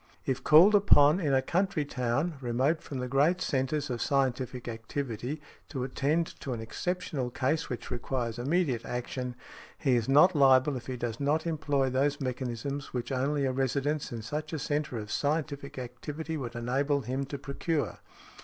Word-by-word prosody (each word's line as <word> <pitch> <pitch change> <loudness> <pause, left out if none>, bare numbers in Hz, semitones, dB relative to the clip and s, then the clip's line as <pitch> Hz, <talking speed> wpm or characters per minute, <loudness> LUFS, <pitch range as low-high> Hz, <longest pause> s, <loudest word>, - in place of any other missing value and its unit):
If 130 0 -1
called 165 +7 +8
upon 170 -6 +6
in 155 -6 0
a 130 -1 +3
country 175 0 0
town, 135 +5 -1
remote 130 +6 +1
from 140 - -6
the 125 0 -3
great 145 +8 +3
centres 140 0 0
of 120 - -3
scientific 130 -2 0
activity, 120 +3 -4 0.3
to 135 -5 -3
attend 145 +5 +1
to 135 - -4
an 115 - -4
exceptional 145 +3 -3
case 140 +6 -1
which 125 -3 -5
requires 120 -1 -2
immediate 135 -3 +1
action, 125 0 -4 0.4
he 135 -5 +2
is 120 +1 0
not 155 +6 +6
liable 135 0 +5
if 125 - -7
he 130 -1 -3
does 120 -2 -3
not 150 +3 +1
employ 145 -5 0
those 140 +2 +1
mechanisms 130 +1 -4
which 120 0 -3
only 140 +2 +1
a 130 - +1
residence 140 +3 -1
in 115 -2 -5
such 150 +7 -4
a - - 0
centre 145 -2 -2
of 105 -1 -6
scientific 145 -2 -2
activity 145 +6 -5
would 125 -6 -5
enable 135 +4 0
him 130 +2 -2
to 140 +1 -5
procure. 145 +2 -2
135 Hz, 170 wpm, -29 LUFS, 125-150 Hz, 0.4 s, called